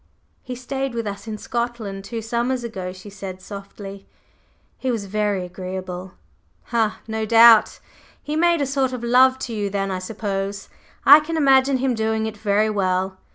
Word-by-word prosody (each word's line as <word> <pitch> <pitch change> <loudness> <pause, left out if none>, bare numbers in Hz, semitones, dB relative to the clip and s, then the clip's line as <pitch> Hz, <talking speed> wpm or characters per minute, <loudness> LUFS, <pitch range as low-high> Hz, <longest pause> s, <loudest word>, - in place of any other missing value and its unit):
"He 250 - -6
stayed 265 +1 -4
with 230 -1 -2
us 200 +2 -6
in 215 -1 -4
Scotland 230 -4 -4
two 225 +2 -5
summers 240 +2 -1
ago," 190 -6 -5
she 185 +2 -11
said 195 -2 -7
softly. 200 0 -9 0.7
"He 260 - -2
was 225 -5 -1
very 205 -2 -1
agreeable. 185 0 -6 0.3
…" - - -40
"Ha! 225 -2 +1
No 220 0 -2
doubt! 230 0 +6 0.4
He 295 - -3
made 340 0 +3
a - - +2
sort 270 -1 0
of 245 -2 -5
love 255 +2 +5
to 240 - -6
you 205 -2 -2
then, 195 0 -2
I 185 - -2
suppose. 195 0 -4 0.4
I 290 +2 +10
can 325 +2 -4
imagine 270 -2 +4
him 260 0 0
doing 220 -1 0
it 220 -1 -4
very 210 0 +1
well! 190 -1 -1
220 Hz, 175 wpm, -22 LUFS, 195-250 Hz, 0.7 s, I